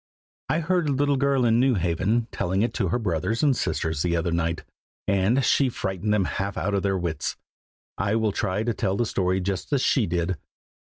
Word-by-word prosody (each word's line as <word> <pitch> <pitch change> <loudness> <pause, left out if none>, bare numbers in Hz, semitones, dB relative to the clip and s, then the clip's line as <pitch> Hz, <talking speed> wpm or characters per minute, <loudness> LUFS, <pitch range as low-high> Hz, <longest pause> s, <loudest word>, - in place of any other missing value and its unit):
I 160 - +1
heard 170 -1 +1
a - - +2
little 145 +1 +2
girl 135 -2 +2
in 115 0 +4
New 130 -1 +3
Haven, 95 +6 0
telling 95 +4 0
it 120 - -1
to 100 - 0
her 90 - +1
brothers 110 - -1
and 140 -3 +4
sisters 80 -9 -1
the 85 0 +1
other 85 +1 0
night, 85 -1 -1 0.4
and 105 +6 +2
she 135 +1 +3
frightened 95 -2 -2
them 105 -3 +2
half 100 +2 -3
out 100 +2 -1
of 100 - +1
their 95 0 0
wits. 80 -5 -3 0.6
I 100 +2 +1
will 110 -2 +1
try 95 +2 -1
to 120 0 0
tell 100 -2 -1
the 120 - +1
story 95 -3 0
just 95 +4 -3
as 140 -3 +2
she 120 -6 +2
did. 85 +1 -1
100 Hz, 210 wpm, -25 LUFS, 90-120 Hz, 0.6 s, in